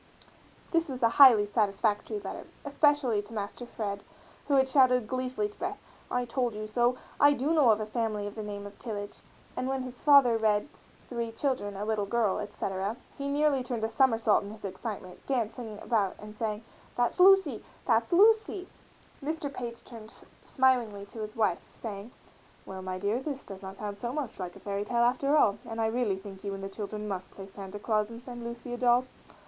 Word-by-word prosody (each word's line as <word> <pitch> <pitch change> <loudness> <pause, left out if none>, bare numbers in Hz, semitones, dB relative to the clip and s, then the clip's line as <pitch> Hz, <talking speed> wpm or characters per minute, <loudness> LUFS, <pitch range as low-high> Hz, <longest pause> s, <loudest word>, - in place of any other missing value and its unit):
This 330 -2 +2
was 255 -2 -4
a 230 - +6
highly 235 -4 +8
satisfactory 210 - 0
letter, - - -7 0.2
especially 285 -6 +2
to 205 +2 -13
Master 215 +3 -5
Fred 205 -4 -4 0.5
who 285 - +3
had 265 -1 +4
shouted 255 -3 +4
gleefully 255 -3 -1
to 210 - -17
Beth, 395 +3 -3 0.3
"I 245 0 0
told 240 -2 -1
you 215 0 -4
so!" 240 +3 +1 0.2
"I 290 0 +7
do 285 +4 0
know 295 -7 +5
a 215 -1 +3
family 215 -2 -2
of 205 - -5
the 220 - -6
name 205 -1 -6
of 205 0 -11
Tillage," 205 -3 -6 0.4
and 255 - -2
when 265 -1 -1
his 255 -1 -8
father 275 -6 +6
read 210 0 +2 0.4
"three 235 -2 -3
children, 225 -5 -2
a 205 - -3
little 215 -2 0
girl, 220 -2 +1
etc.," 200 +1 -3 0.2
he 280 - -4
nearly 285 -1 +2
turned 245 -3 -3
a 220 - +1
somersault 225 -4 +3
in 200 - -7
his 215 0 -9
excitement, 190 -1 -6
dancing 230 -3 -2
about 205 -5 +1
and 210 0 -10
saying, 215 0 -3 0.3
"that's 245 +7 0
Lucy! 370 - +6 0.2
that's 230 -1 +2
Lucy!" 415 0 +4 0.6
Mr. 295 -1 -3
Page 235 -3 -6
turned 225 -2 -11 0.3
smilingly 245 -7 +1
to 210 +3 -11
his 215 0 -5
wife, 210 -6 0
saying, 205 -1 -6 0.6
"Well, 190 0 -7
my 185 0 -4
dear, 205 +5 0
this 275 0 -5
does 195 -1 -8
not 190 0 -8
sound 205 -1 -5
so 240 +2 -3
much 275 -6 -4
like 180 -2 -5
a - - -11
fairy 200 0 -3
tale 235 +2 +1
after 275 +5 +3
all, 210 -7 +4
and 225 -1 -6
I 225 - +2
really 220 -3 0
think 195 0 -10
you 200 -1 -3
and 195 - -8
the 195 - -4
children 210 +1 -5
must 190 -2 -4
play 195 - -10
Santa 195 0 -8
Claus 215 0 0
and 230 +1 -10
send 245 -2 -8
Lucy 235 +1 -6
a - - -3
doll." 245 0 +4
225 Hz, 195 wpm, -29 LUFS, 205-255 Hz, 0.6 s, highly